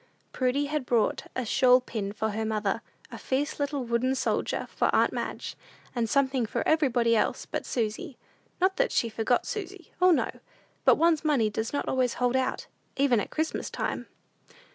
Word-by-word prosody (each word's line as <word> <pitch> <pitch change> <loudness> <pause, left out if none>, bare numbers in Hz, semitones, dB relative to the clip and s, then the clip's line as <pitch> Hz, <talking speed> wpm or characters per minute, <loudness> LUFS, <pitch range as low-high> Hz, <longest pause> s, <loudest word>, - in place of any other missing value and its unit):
'" - - -40
Prudy 260 +3 +1
had 290 -3 -3
bought 230 -3 +1
a 255 - -2
shawl 250 +2 +5
pin 220 -5 -4
for 220 +1 -2
her 220 +2 -2
mother, 215 0 -1 0.3
a - - -8
fierce 280 +4 -2
little 285 -2 -1
wooden 240 +3 +1
soldier 260 - -1
for - - +2
aunt - - +3
Madge, - - -4 0.4
and 235 -2 -1
something 265 -3 +2
for - - -2
everybody 245 -7 +3
else 215 - 0
but - - -4
Susy. 240 - -3 0.4
Not 375 +1 +2
that - - +2
she 230 - +1
forgot 225 +2 0
Susy. 390 -3 -6
O, 365 - +7
no! 345 - +2 0.5
but - - +7
one's 325 -1 +3
money 265 -9 +2
does 220 +2 -3
not 285 - -2
always 255 -2 +1
hold 250 0 +1
out, 260 0 0 0.3
even 270 -4 +3
at - - -3
Christmas 315 0 -2
time. - - -3
255 Hz, 180 wpm, -28 LUFS, 230-290 Hz, 0.5 s, O